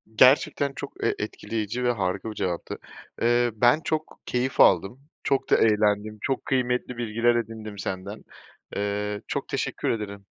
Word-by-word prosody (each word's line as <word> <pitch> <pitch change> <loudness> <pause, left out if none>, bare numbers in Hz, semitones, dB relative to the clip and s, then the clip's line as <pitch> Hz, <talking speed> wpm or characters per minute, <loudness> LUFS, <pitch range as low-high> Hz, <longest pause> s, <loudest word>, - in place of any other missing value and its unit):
Gerçekten 135 +3 +5
çok, - - -7
eee, - - +2
etkileyici 115 +2 -3
ve 125 - +3
harika 100 0 -2
bir - - -10
cevaptı. 90 -3 -3 0.4
Eee, 120 +1 +3
ben, 120 +8 +4
çok 155 0 -2
keyif 125 +1 -1
aldım, 95 +7 +5 0.2
çok 135 -1 0
da - - +6
eğlendim, 105 0 +2
çok 135 -2 -1
kıymetli 125 -2 0
bilgiler 120 +1 +2
edindim 110 -2 -4
senden. 95 +3 -5 0.5
Eee, 105 0 -2
çok - - -3
teşekkür - - -2
ederim. 100 -3 -3
110 Hz, 145 wpm, -26 LUFS, 105-125 Hz, 0.5 s, da